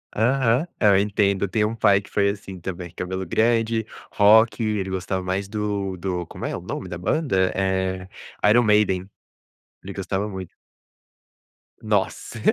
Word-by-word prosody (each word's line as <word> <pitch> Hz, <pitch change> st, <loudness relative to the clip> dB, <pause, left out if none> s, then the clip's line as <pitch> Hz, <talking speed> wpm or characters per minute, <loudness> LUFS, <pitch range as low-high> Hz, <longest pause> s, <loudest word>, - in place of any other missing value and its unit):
Aham. 125 Hz, +5 st, +2 dB
É, 105 Hz, -, +4 dB
eu 100 Hz, -, +5 dB
entendo, 100 Hz, -1 st, +1 dB
tenho 105 Hz, +2 st, +1 dB
um 115 Hz, -, -5 dB
pai 100 Hz, -3 st, +4 dB
que -, -, -16 dB
foi 100 Hz, -1 st, +2 dB
assim 95 Hz, -2 st, -6 dB
também, 90 Hz, 0 st, -6 dB
cabelo 95 Hz, +1 st, -4 dB
grande, 115 Hz, +3 st, +1 dB, 0.3 s
rock, 110 Hz, +2 st, +5 dB
ele 105 Hz, -3 st, -1 dB
gostava 95 Hz, 0 st, -2 dB
mais 95 Hz, +2 st, -2 dB
do 100 Hz, -2 st, -3 dB
do 90 Hz, -1 st, -3 dB
como -, -, -7 dB
é -, -, -2 dB
o -, -, -6 dB
nome -, -, -5 dB
da 90 Hz, -, -5 dB
banda? 95 Hz, -, +1 dB
Eh, 95 Hz, -1 st, -1 dB, 0.4 s
Iron 120 Hz, +3 st, +5 dB
Maiden, 105 Hz, -3 st, +2 dB, 0.7 s
ele 100 Hz, +1 st, -7 dB
gostava 95 Hz, +1 st, -2 dB
muito. 95 Hz, -3 st, -6 dB, 1.3 s
Nossa. 105 Hz, -3 st, -1 dB
100 Hz, 155 wpm, -23 LUFS, 95-110 Hz, 1.3 s, eu